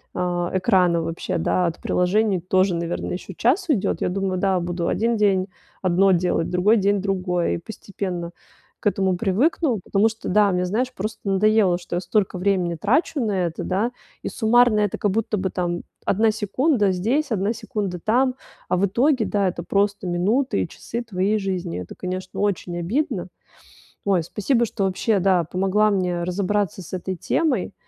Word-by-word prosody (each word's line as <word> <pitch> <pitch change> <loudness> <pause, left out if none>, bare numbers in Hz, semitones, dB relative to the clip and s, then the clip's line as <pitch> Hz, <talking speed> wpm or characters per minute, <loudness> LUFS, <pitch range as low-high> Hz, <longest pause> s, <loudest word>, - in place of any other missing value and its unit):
а, 175 -1 -1
экрана 180 -4 +3
вообще, 165 +1 -3
да, 175 +2 +1
от 165 - -4
приложений 195 +2 +2
тоже, 185 +1 +2
наверное, 170 +1 -3
еще 185 +1 -7
час 315 - +1
уйдет, 240 -11 +1
я - - +1
думаю, 190 0 -1
да, 190 -1 +2
буду 175 0 -2
один 230 +1 +1
день 195 -3 +2 0.4
одно 185 +1 +4
делать, 175 -2 +1
другой 190 +5 +3
день- 200 0 +2
другое. 180 -3 0
И - - -1
постепенно 185 -3 -5 0.5
к - - -23
этому 190 -2 +1
привыкну, 235 - +1
потому 200 +2 +2
что, 225 0 -5
да, 205 +1 +4
мне, 180 0 0
знаешь, 245 +7 -1
просто 215 +1 -5
надоело, 195 -2 +3
что 175 - -6
я - - +1
столько 190 +1 0
времени 180 -2 0
трачу 265 - +1
на 225 -5 0 0.2
это, 165 - -5
да, 205 +6 0 0.3
и - - -4
суммарно 240 -1 +3
это 205 -2 0
как 205 - +1
будто 215 +1 -1
бы, 190 0 -1
там, 175 -1 -2 0.2
1 220 +3 +3
секунда 215 +1 +1
здесь, 240 +11 0
1 205 +1 0
секунда 210 -5 -4
там, 250 +7 +2 0.3
а - - +2
в 195 - +3
итоге, 245 +4 +2
да, 200 -2 +1
это 175 -1 -3
просто 200 +2 0
минуты 205 +10 +1
и - - -2
часы 235 - -6
твоей 205 -1 0
жизни- 185 - -3
это, 90 - -9
конечно, 185 0 -5
очень 185 -3 -1
обидно. 200 - -2 0.8
Ой, 190 -4 +2
спасибо, 230 - 0
что 200 -3 -2
вообще, 195 +2 +1
да, 185 -2 +3
помогла, 195 +5 +1
да, - - +2
мне 180 -2 -1
разобраться 195 +1 -1
с 175 - -12
этой 185 +1 -3
темой, 310 - 0
195 Hz, 175 wpm, -23 LUFS, 180-215 Hz, 0.8 s, одно